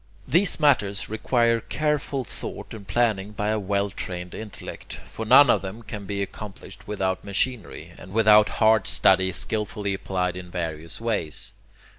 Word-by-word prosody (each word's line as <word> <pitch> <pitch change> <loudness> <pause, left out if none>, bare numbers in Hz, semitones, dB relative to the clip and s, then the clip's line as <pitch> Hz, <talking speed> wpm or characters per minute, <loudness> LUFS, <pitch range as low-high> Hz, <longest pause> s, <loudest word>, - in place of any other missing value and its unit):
These 170 +7 +3
matters 110 -10 +2
require 115 +1 +2
careful 145 +2 -1
thought - - -7
and 105 -3 -10
planning 105 -1 0
by 105 0 -2
a 110 0 +1
well 100 0 -1
trained 90 -2 -6
intellect; 110 -2 -8
for 110 - -7
none 135 +5 +8
of - - +3
them 100 +4 -7
can 105 -2 -7
be 100 0 -1
accomplished 100 0 -10
without 95 -3 -2
machinery, 105 +2 -2
and 90 - -12
without 105 0 +6
hard 110 -2 +4
study 95 0 +4
skilfully 105 +1 -2
applied 90 -2 -2
in 90 -1 -8
various 80 -2 -5
ways. 105 -9 -2
105 Hz, 150 wpm, -25 LUFS, 95-115 Hz, -, none